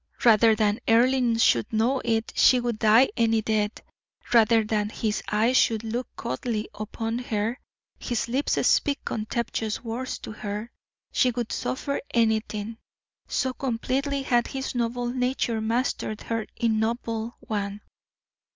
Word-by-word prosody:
Rather 225 -1 +6
than 210 0 +1
Earle 240 +1 +3
should 120 - +3
know 240 +4 +1
it, 225 -1 -1
she 255 - +6
would 240 -3 -2
die 225 +4 +5
any 225 -2 +2
death; 215 -1 -1 0.5
rather 225 -1 +5
than 210 -1 -1
his 215 -1 -2
eyes 225 +4 +2
should 225 -1 +2
look 235 +3 -3
coldly 215 - -3
upon 225 +2 -4
her, 225 0 -2 0.4
his 235 -1 -2
lips 260 +5 0
speak 285 -1 +2
contemptuous 220 0 -3
words 240 +3 -4
to - - -8
her, 210 +2 -5 0.4
she 255 - +3
would 240 -1 -3
suffer 280 +2 -2
anything, 220 -1 0 0.5
so 260 -1 -1
completely 270 +3 -1
had 240 -2 +2
his 265 0 -4
noble 245 0 -1
nature 250 -2 -1
mastered 225 -1 -1
her 225 -1 -3
ignoble 225 0 -1
one. 205 -1 -4
230 Hz, 135 wpm, -26 LUFS, 220-245 Hz, 0.5 s, Rather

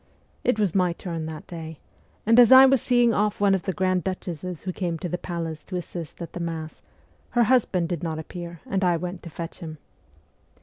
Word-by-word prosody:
It 245 - +2
was 205 -6 +1
my 180 -3 +2
turn 165 -2 -5
that 155 -1 -7
day; 160 -2 -8 0.5
and 230 +3 +6
as 240 -1 +8
I 260 +1 +11
was 265 -3 +4
seeing 245 -2 +3
off 210 0 0
one 200 -1 +4
of 190 - +1
the 190 - -2
grand 185 -1 0
duchesses 180 -2 -5
who 185 - -3
came 175 -3 -2
to 180 - -4
the 175 +1 -3
palace 165 -3 -5
to 185 - -6
assist 175 -2 -6
at 165 - -9
the - - -5
Mass, 165 -2 -5 0.6
her 240 - +6
husband 210 -8 +2
did 175 -4 -2
not 160 -2 -3
appear 170 0 -7
and 195 0 -1
I 175 -2 +3
went 180 +2 -5
to 170 - -9
fetch 165 +2 -7
him. 160 -3 -7
180 Hz, 215 wpm, -25 LUFS, 165-195 Hz, 0.6 s, I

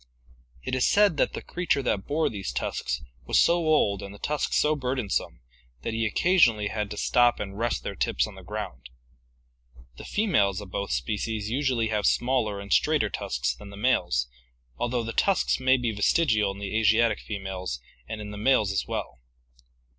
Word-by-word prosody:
It - - -5
is 130 -1 +3
said 200 -6 +4
that - - +1
the - - -6
creature 175 -6 -1
that 100 -6 -1
bore 155 +2 +1
these 100 -3 -4
tusks - - -3 0.2
was - - +3
so 170 - +5
old 155 - +2
and 100 - -7
the 100 - -11
tusks 150 +7 -1
so 155 +1 +3
burdensome 125 - -2 0.4
that 115 - -3
he 115 0 0
occasionally 115 - +3
had 105 -2 -3
to 105 - -6
stop 120 +2 +3
and 100 -1 -5
rest 115 +3 -1
their - - -4
tips - - 0
on - - -9
the - - -12
ground. 60 -1 -7 1.1
The - - -9
females 105 - +1
of 100 -3 -10
both 100 +1 -3
species 105 - -2
usually 125 -4 +1
have 105 -2 +1
smaller 120 -5 +1
and 100 0 -2
straighter - - +2
tusks 60 +1 -2
than 100 +11 -12
the 100 - -10
males, 90 - +1 0.5
although 120 - -1
the 115 0 -5
tusks 195 -2 +2
may 130 0 +4
be 120 -2 -1
vestigial 105 0 +2
in 95 - -9
the 100 +1 -5
Asiatic 110 0 +3
females 95 - -5 0.3
and 110 - -5
in 105 -1 -7
the 105 - -7
males 110 -4 +3
as 95 - -1
well. - - -4
110 Hz, 185 wpm, -26 LUFS, 100-130 Hz, 1.1 s, so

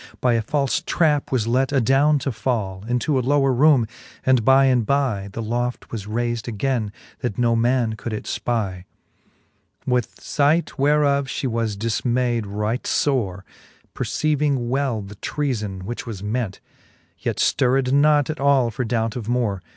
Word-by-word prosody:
By 125 +1 +2
a 115 - +2
falfe 140 +4 0
trap 150 -4 +1
was 125 -5 +1
let 130 +4 +1
adowne 140 +3 +3
to 135 - -1
fall 105 -5 -2
Into 125 +3 +1
a - - +1
lower 135 +1 +2
roome, 135 -2 +5 0.4
and 130 -3 +4
by 135 +3 +5
and 125 -3 +3
by 110 -6 0
The 115 +3 -5
loft 120 +2 -3
was 105 -3 -5
rayfd 120 +1 -2
againe, 115 -1 -1 0.3
that 120 -5 -3
no 120 -1 +2
man 120 0 +1
could 110 +2 -6
it 105 - -4
Ipic. 100 -7 -2
XXVIII. - - -20 1.0
With 125 -2 +1
fight 150 +3 0
whereof 140 -1 +3
fhe 135 - -4
was 115 -3 -2
difmayd 120 +1 0
right 105 +5 -2
fore, 100 -9 0 0.5
Perceiving 145 -5 0
well 130 -5 0
the 100 +1 -11
treafon, 110 -9 -3
which 120 +5 -6
was 105 -4 -6
ment: 105 -2 -3 0.6
Yet - - -2
fllrred 130 0 +2
not 145 +1 +4
at 155 - -7
all 135 -4 +3
for 125 - -3
doubt 115 -1 -1
of 115 -3 -5
more. 115 -6 0
120 Hz, 160 wpm, -22 LUFS, 110-135 Hz, 1.0 s, roome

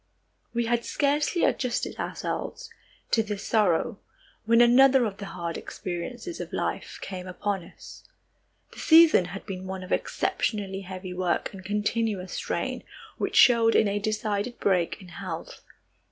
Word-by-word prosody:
We 235 0 0
had 235 0 +1
scarcely 295 +6 +1
adjusted 250 -2 0
ourselves - - -4 0.4
to 225 - +4
this 210 -2 -5
sorrow 205 -3 +1 0.5
when 230 +1 +4
another 255 +2 +6
of 200 -3 -4
the 200 - -7
hard 170 -3 -4
experiences 240 - -6
of - - -6
life - - -3
came 185 -1 -6
upon 195 0 -2
us. - - -13 0.7
The - - -12
season 320 - +7
had 190 +2 -8
been 185 -1 -6
one 190 0 -5
of 185 - -10
exceptionally 195 -3 -1
heavy 185 -1 -7
work 180 +1 -1
and 190 -1 -10
continuous 210 -1 -1
strain, - - -3 0.4
which - - -2
showed 230 -3 +6
in 215 - +5
a 200 +1 0
decided 215 +2 -2
break 180 -4 +1
in 185 - -13
health. 170 - -7
205 Hz, 145 wpm, -27 LUFS, 185-235 Hz, 0.7 s, season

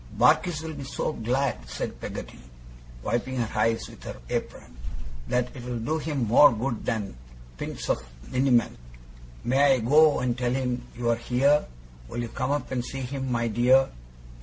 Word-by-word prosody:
'Barkis 170 -4 +4
will 160 -1 -5
be 140 -2 -7
so 135 +3 -2
glad,' 120 - -1
said - - -5
Peggotty, - - -7 0.6
wiping 120 +2 -1
her 115 -2 0
eyes 115 0 +1
with - - -14
her - - -7
apron, - - -4 0.5
'that 125 +1 0
it'll 125 -1 -5
do 155 +8 -1
him 145 -5 -1
more 125 +7 +8
good 120 +1 -2
than 105 - -2 0.4
pints - - -5
of 60 - 0 0.3
liniment. 125 - +2 0.6
May 135 +2 +4
I - - -1
go 150 +6 +5
and 125 -2 0
tell 125 -1 0
him 125 -2 -1 0.2
you 120 -1 +1
are - - +3
here? 135 +5 +2 0.4
Will 120 - -4
you 115 - -5
come 130 +3 -2
up 145 -2 -1
and 125 -2 -1
see 135 +2 -5
him, 130 0 -3
my 120 -1 +1
dear? 125 +4 +4
125 Hz, 170 wpm, -26 LUFS, 120-135 Hz, 0.6 s, more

